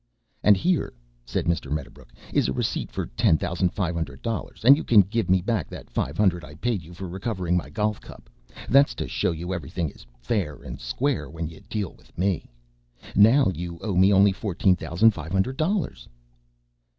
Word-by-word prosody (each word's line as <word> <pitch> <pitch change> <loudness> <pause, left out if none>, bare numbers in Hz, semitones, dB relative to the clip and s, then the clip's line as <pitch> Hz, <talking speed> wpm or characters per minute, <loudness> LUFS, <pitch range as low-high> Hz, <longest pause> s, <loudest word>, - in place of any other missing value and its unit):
"And 105 -2 +6
here," 175 - 0 0.3
said - - -2
Mr. 85 -5 -1
Medderbrook, 65 -4 -6 0.2
"is - - +3
a 65 - -1
receipt - - -2
for - - -3
ten 80 +6 +2
thousand 90 +3 0
five 90 -2 -2
hundred 80 -5 -5
dollars, 115 -1 -4
and 135 +3 +10
you 155 - -4
can 110 -3 +6
give 105 +2 -2
me 95 -1 +3
back 105 - -1
that - - -10
five 70 +5 -2
hundred 90 -5 +2
I 75 0 -11
paid 115 +3 -1
you 80 +2 -14
for 95 +2 -6
recovering 95 -1 -3
of 90 - +4
my 75 - -9
golf 105 +6 -1
cup. - - -13 0.4
That's 140 +4 +5
to - - -4
show - - 0
you 85 +3 -3
everything 85 0 -3
is - - -17
fair 75 - -1
and - - -8
square 75 - -1
when 80 0 -5
you 80 - -13
deal 105 -5 -3
with - - -24
me. 95 0 -1 0.7
Now 115 +3 +6
you 85 0 -6
owe 105 -4 -2
me 95 +2 +5
only 100 0 +6
fourteen 95 -1 +1
thousand 95 +6 +3
five 80 -5 -8
hundred 100 +7 +1
dollars." 160 - -1
90 Hz, 200 wpm, -25 LUFS, 80-105 Hz, 0.7 s, and